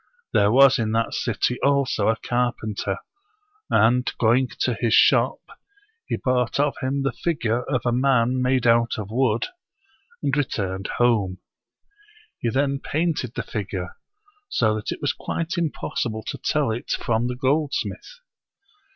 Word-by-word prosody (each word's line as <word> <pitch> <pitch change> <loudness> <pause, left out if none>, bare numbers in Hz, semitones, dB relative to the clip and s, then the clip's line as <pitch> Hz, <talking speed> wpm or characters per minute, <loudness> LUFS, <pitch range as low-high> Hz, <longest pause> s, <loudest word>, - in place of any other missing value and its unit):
There 100 +1 +4
was 135 +1 +6
in 110 -1 -1
that 115 0 0
city 120 +1 -1
also 140 -6 +2
a 115 - +3
carpenter; 110 -5 -2 0.7
and, 125 +3 +3
going 120 +3 +3
to 125 - +2
his 115 0 +1
shop, - - +4 0.7
he - - -1
bought 125 0 0
of 145 0 +2
him 135 +1 -1
the 135 - +1
figure 120 -7 -1
of 130 - 0
a 120 - +2
man 125 0 +2
made 125 -1 +1
out 115 0 +3
of 105 -1 -6
wood, 120 -2 +1 0.8
and 140 -1 +1
returned 95 -9 -2
home. 105 -6 +2 1.0
He 120 - -1
then 140 +2 0
painted 150 -6 -2
the - - -2
figure, 95 -4 -5 0.5
so 110 -2 +2
that 110 -1 -4
it - - -6
was - - 0
quite 165 +2 -3
impossible 125 -9 -2
to - - -5
tell 150 -6 0
it 120 +5 -5
from 115 -1 0
the 125 - -3
goldsmith. 145 - -2
125 Hz, 145 wpm, -23 LUFS, 110-135 Hz, 1.0 s, was